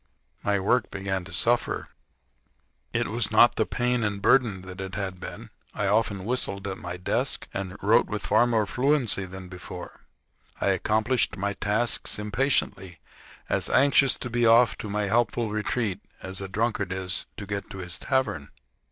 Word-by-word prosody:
Mv 100 -1 +1
work 125 +5 +2
began 95 -1 -3
to 95 - -11
suffer. 120 +1 0 1.0
It - - 0
was - - 0
not - - +6
the - - +1
pain 125 -1 0
and 100 -1 -1
burden 110 -2 +3
to - - -13
me 90 - -6
that 95 - -8
it 95 +1 -6
had 95 -2 -3
been. - - -8 0.2
I - - -1
often 100 -1 +1
whistled 105 -5 -1
at 95 -1 -4
my 90 0 -5
desk, 90 - -1
and 95 0 -4
wrote 105 +3 +4
with 105 -1 -4
far 110 +4 +4
more 110 -3 +2
fluency 125 -3 +1
than 95 0 -9
before. 90 0 -10 0.5
I - - +1
accomplished 110 +7 +1
my 100 +1 -1
tasks 105 +4 0
impatiently, 105 - -1 0.5
as - - 0
anxious 140 0 +4
to 125 - -6
be 120 0 +1
off 115 -2 +6
to 110 - -5
my 105 +1 -1
helpful 115 +1 +1
retreat 105 -1 -1 0.2
as 95 +1 -6
a 95 - -4
drunkard 100 -1 -1
is 95 -1 -2
to 100 - -6
get 100 0 -4
to - - -8
his 85 -3 -4
tavern. 130 - -1
100 Hz, 175 wpm, -26 LUFS, 95-120 Hz, 1.0 s, not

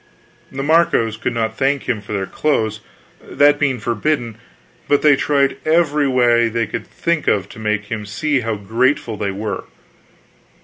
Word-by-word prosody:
The 135 +1 -4
Marcos 145 -8 +2
could 115 +2 -3
not 110 -1 -2
thank 140 0 +1
him 115 -5 -2
for 105 - -11
their 100 -2 -1
clothes, 110 -5 -1 0.4
that 145 0 +3
being 135 -4 0
forbidden; 120 +1 -2 0.5
but 145 - +2
they 150 -2 +6
tried 140 -1 +1
every 150 -3 +2
way 120 -3 +3
they 115 0 -1
could 115 - -6
think 170 -2 -2
of 100 -2 +1
to - - -12
make 105 -1 -1
him 105 -2 -4
see 140 +7 0
how 115 -2 -2
grateful 115 +5 0
they 100 -1 -2
were. 100 +1 -4
120 Hz, 165 wpm, -19 LUFS, 110-145 Hz, 0.5 s, they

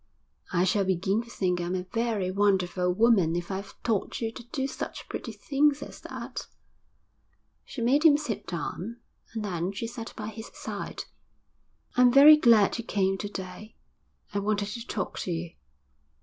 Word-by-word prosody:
'I 175 0 +2
shall 200 +1 +2
begin 190 +3 +1
to 235 - -13
think 180 -5 0
I'm 175 +1 -2
a 180 - -2
very 225 -5 0
wonderful 185 -2 +2
woman 190 -5 +4
if 175 +2 -3
I've 195 +1 -5
taught 220 -5 -1
you 225 -1 -2
to - - -9
do 265 +2 -3
such 275 - -5
pretty 230 - -5
things 280 +7 +1
as - - -10
that.' - - -7 1.2
She 240 - -5
made 265 +5 +4
him 300 -3 +7
sit 275 -9 -4
down, 190 +6 -4 0.4
and 220 -1 -2
then 180 -1 -2
she 200 +3 -4
sat 230 0 -6
by 210 -1 -4
his 220 +1 -8
side. - - -5 0.9
'I'm 250 -1 +6
very 285 +4 +10
glad 230 -6 +5
you - - -3
came 195 -3 +1
to 205 - -4
day. 195 +2 -8 0.6
I 200 - +1
wanted 205 0 0
to 230 +3 -7
talk 195 - -3
to 180 - -3
you. 170 0 -3
205 Hz, 170 wpm, -28 LUFS, 185-235 Hz, 1.2 s, very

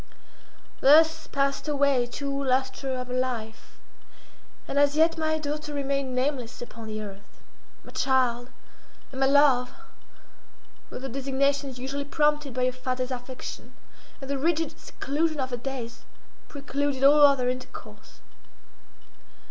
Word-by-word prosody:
Thus 320 +3 +5
passed 275 +1 -1
away 280 -4 +2
two 275 +2 -3
lustra 265 0 0
of - - -5
her 250 - -7
life, 240 -4 -4 0.9
and 280 - 0
as 285 0 +4
yet 325 +1 +4
my 315 -1 0
daughter 300 0 -4
remained 275 -2 -1
nameless 255 -2 -2
upon 230 -2 -8
the 215 0 -4
earth. 200 0 -12 0.4
"My - - -13
child," 250 -2 +1 0.6
and 265 - -7
"my 270 - +4
love," 275 -3 +4 1.2
were - - -7
the 265 - -5
designations 275 +1 0
usually 270 +3 -4
prompted 295 -1 +1
by 255 - 0
a 255 - +2
father's 255 0 -3
affection, 250 0 -7 0.5
and 270 - -8
the 280 0 -2
rigid 325 +1 0
seclusion 310 +2 -2
of 260 -1 -2
her 245 - -2
days 240 -2 -6 0.4
precluded 280 -1 -2
all 290 +2 +7
other 275 -3 +6
intercourse. 255 0 -7
270 Hz, 130 wpm, -26 LUFS, 255-285 Hz, 1.2 s, all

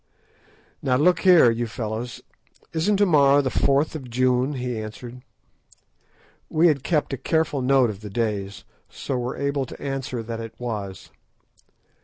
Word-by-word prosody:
"Now 125 - +1
look 165 +6 +3
here, 175 -10 +6
you 120 +1 -2
fellows, 115 +2 -5 0.5
isn't 185 +6 +1
to 205 - +4
morrow 145 -5 +5
the 130 - -1
4th 140 +3 +2
of 135 -6 -7
June?" 130 +3 +1
he 125 -3 -3
said. 125 +2 -11 1.3
We 165 +2 +4
had 140 -4 0
kept 150 -4 0
a - - -2
careful 150 +1 0
note 130 -2 +3
of 100 0 -11
the 105 - -7
days, 100 -2 -3 0.3
so 130 -2 -4
were 125 +1 -4
able 140 -1 -1
to - - -11
answer 135 -3 -4
that 115 0 -5
it 115 -1 -8
was. 105 -6 -6
130 Hz, 155 wpm, -23 LUFS, 115-145 Hz, 1.3 s, here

